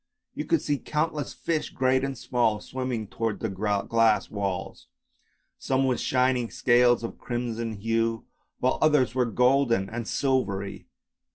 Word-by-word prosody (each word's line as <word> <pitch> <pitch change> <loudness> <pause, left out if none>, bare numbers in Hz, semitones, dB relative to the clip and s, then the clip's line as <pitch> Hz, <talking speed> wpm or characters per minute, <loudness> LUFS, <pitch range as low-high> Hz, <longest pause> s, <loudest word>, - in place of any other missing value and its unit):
You - - -4
could 330 - +1
see 145 -2 0
countless 150 -1 -2
fish, 160 -2 -2
great 130 0 +1
and 135 -1 -3
small, 115 -3 +1
swimming 125 -1 -4
towards 115 0 -3
the 110 - -2
glass 105 +3 +1
walls, 100 -3 -4 0.7
some 135 0 +1
with 130 -2 +1
shining 125 -2 +1
scales 120 -1 +3
of 115 - -6
crimson 115 -2 -3
hue, 115 +2 -1 0.3
while 130 - +1
others 150 -6 +3
were 125 -1 +2
golden 120 -3 +2
and 115 -1 -4
silvery. 100 -8 -1
120 Hz, 135 wpm, -26 LUFS, 110-130 Hz, 0.7 s, scales